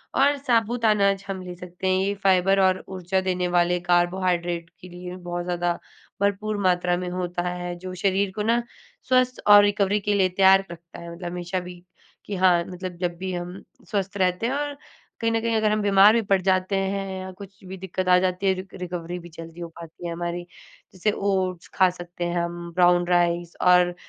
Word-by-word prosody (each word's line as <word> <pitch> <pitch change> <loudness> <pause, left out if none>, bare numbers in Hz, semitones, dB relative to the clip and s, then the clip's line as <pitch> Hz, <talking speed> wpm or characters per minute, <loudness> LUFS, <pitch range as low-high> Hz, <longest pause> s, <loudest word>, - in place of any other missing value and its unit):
और 285 +1 +4
साबूत 235 -3 0
अनाज 200 -2 +3
हम 190 -1 -4
ले 180 -1 -7
सकते 180 +1 -6
हैं, 185 - +3
ये 200 - 0
फ़ाइबर 195 +1 +4
और 185 0 +2
ऊर्जा 190 0 -1
देने 180 -1 -1
वाले 175 0 +2
कार्बोहाइड्रेट 175 -1 0
के 180 - -11
लिए 180 +1 -8
बहुत 175 -1 -5
ज़्यादा 175 -1 0 0.5
भरपूर 205 +1 0
मात्रा 180 -1 +2
में 180 0 -4
होता 180 -1 -3
है 175 0 -4
जो 185 0 -7
शरीर 195 +1 +1
को 210 - -2
ना 235 +2 +2 0.5
स्वस्थ 255 0 +3
और 205 0 +9
रिकवरी 205 0 +2
के 205 +1 0
लिए 190 -2 +3
तैयार 195 +1 +5
रखता 170 0 -11
है 170 0 -8
मतलब 175 0 -6
हमेशा 180 +1 -3
भी 180 0 -9 0.5
कि 205 - -4
हाँ, 180 -2 +4
मतलब 185 -1 -7
जब 175 -1 -2
भी 185 0 -4
हम 175 +2 -6 0.3
स्वस्थ 200 -1 -2
रहते 185 +3 +1
हैं 260 - -1
और 290 0 -3 0.4
कहीं 230 0 +1
न 225 - +1
कहीं 230 -1 0
अगर 215 -1 +2
हम 215 0 +1
बीमार 200 +1 +6
भी 230 - +3
पड़ 195 -1 +4
जाते 185 +1 +1
हैं 195 0 -2
या 185 0 -7
कुछ 195 +1 -13
भी 190 +1 -8
दिक्कत 185 0 -4
आ 180 - +7
जाती 185 +1 0
है 190 - +4
रि 190 +1 -7
रिकवरी 175 -1 -5
भी 175 0 -12
जल्दी 165 +1 -10
हो 170 - -4
पाती 165 +1 -11
है - - -4
हमारी, 175 +1 -4 0.5
जैसे 200 +3 0
ओट्स 190 -3 -1
खा 185 -1 +5
सकते 175 0 -7
हैं 175 0 -2
हम, 170 0 -6
ब्राउन 175 -1 +4
राइस 175 -1 +1
और 180 -1 +4
185 Hz, 205 wpm, -24 LUFS, 175-195 Hz, 0.5 s, और